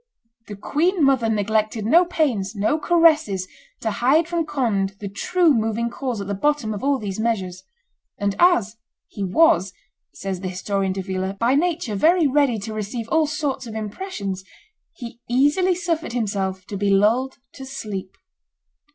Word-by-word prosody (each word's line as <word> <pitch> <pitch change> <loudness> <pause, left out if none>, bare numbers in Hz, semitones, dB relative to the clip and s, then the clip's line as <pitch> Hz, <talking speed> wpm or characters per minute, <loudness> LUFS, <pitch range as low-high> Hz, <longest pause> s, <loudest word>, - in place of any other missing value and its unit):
The 205 - -7
queen 320 - 0
mother 265 -5 +3
neglected 215 +1 0
no 335 +10 +5
pains, 245 - -1
no 215 +10 +1
caresses, 305 - +3 0.3
to 220 - -1
hide 270 +10 +2
from 340 -2 -1
Conde 200 -9 -1
the 205 - -5
true 320 - +2
moving 225 0 -1
cause 250 -3 -4
at 200 - -4
the 200 - -3
bottom 245 0 0
of 205 - -6
all 280 0 +2
these 205 -4 -5
measures; 190 -5 -2 0.6
and 200 -1 -1
as 235 - +3 0.3
"he 200 - -5
was," 195 - +3 0.4
says 190 -2 -5
the 185 - -4
historian 190 +1 -2
Davila, 190 0 -3
"by 235 +5 +1
nature 320 -5 0
very 325 - +3
ready 280 -4 +2
to 215 +2 -6
receive 215 +2 -4
all 320 -1 +2
sorts 285 -4 -3
of 220 - -8
impressions," 205 - -5 0.5
he 240 -6 -9
easily 290 +9 +3
suffered 335 -6 -2
himself 195 -5 -2
to 205 - -6
be 200 +1 0
lulled 225 +7 +2 0.2
to 270 - -10
sleep. 210 -8 -6
225 Hz, 160 wpm, -22 LUFS, 200-295 Hz, 0.6 s, no